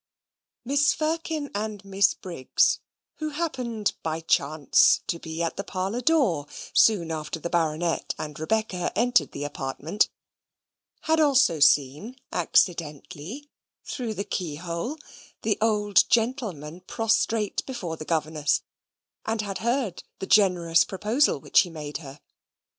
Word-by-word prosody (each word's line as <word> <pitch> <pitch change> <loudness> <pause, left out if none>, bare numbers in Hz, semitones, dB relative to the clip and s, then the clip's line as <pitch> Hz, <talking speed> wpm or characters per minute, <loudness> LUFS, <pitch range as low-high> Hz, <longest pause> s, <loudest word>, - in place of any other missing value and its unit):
Mrs. 285 +1 +3
Firkin 315 -1 -2
and 205 -1 -4
Miss 195 +1 +2
Briggs, 170 -8 +1 0.4
who 310 -1 -3
happened 250 -9 -2
by 160 0 -2
chance 155 -2 +3
to 170 - -3
be 160 +1 -4
at 165 - -3
the 200 - -3
parlour 195 +5 -3
door 250 - +2 0.3
soon 180 -7 +4
after 155 +1 -4
the 170 - -5
Baronet 165 0 0
and 150 -1 -6
Rebecca 185 +1 -1
entered 235 - +3
the 145 - -5
apartment, 145 +6 -1 0.9
had 320 0 +1
also 275 - +4
seen 145 - +3 0.2
accidentally, 170 - -1 0.3
through 235 -5 -4
the 200 - -2
keyhole, 170 - -4 0.5
the 215 -2 0
old 210 -2 +3
gentleman 220 - -1
prostrate 225 -1 0
before 195 -11 -4
the 155 - -8
governess, 155 -2 0 0.6
and 220 -1 0
had 195 -2 -4
heard 235 -5 -1 0.2
the - - -5
generous 180 -5 +4
proposal 215 - +1
which - - +3
he 180 - +2
made 150 -3 -6
her. 140 -2 -11
190 Hz, 125 wpm, -26 LUFS, 160-230 Hz, 0.9 s, soon